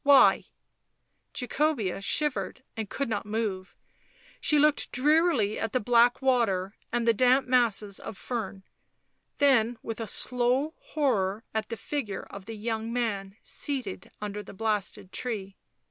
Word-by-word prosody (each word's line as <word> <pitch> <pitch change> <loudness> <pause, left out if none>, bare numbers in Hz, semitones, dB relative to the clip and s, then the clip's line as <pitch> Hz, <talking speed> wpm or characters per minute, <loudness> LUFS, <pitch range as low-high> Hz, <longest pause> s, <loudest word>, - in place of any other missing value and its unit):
" - - -49
Why 280 -1 +6 0.4
?" - - -48
Jacobea 250 - 0
shivered 280 +3 0
and 220 -3 -4
could 275 - -2
not 215 -3 -2
move; 210 -3 -3 0.6
she 300 - +3
looked 300 0 +3
drearily 295 - +3
at 225 -1 -2
the 255 - +3
black 240 +3 +4
water 205 -7 +2 0.2
and 235 0 0
the 230 - +6
damp 255 +4 +4
masses 225 -5 +2
of 205 - -8
fern, 205 -5 -4 0.7
then 245 -5 +4
with 225 0 -5
a 225 - -3
slow 250 +7 +1
horror 215 -9 0
at 220 -1 -2
the 230 - -4
figure 220 -4 -4
of 200 -1 -9
the 225 - -7
young 225 +1 -3
man 205 -5 -2
seated 255 -10 -3
under 210 0 -4
the 205 - -12
blasted 210 -3 -2
tree. 200 -6 -4
230 Hz, 145 wpm, -28 LUFS, 205-255 Hz, 0.7 s, Why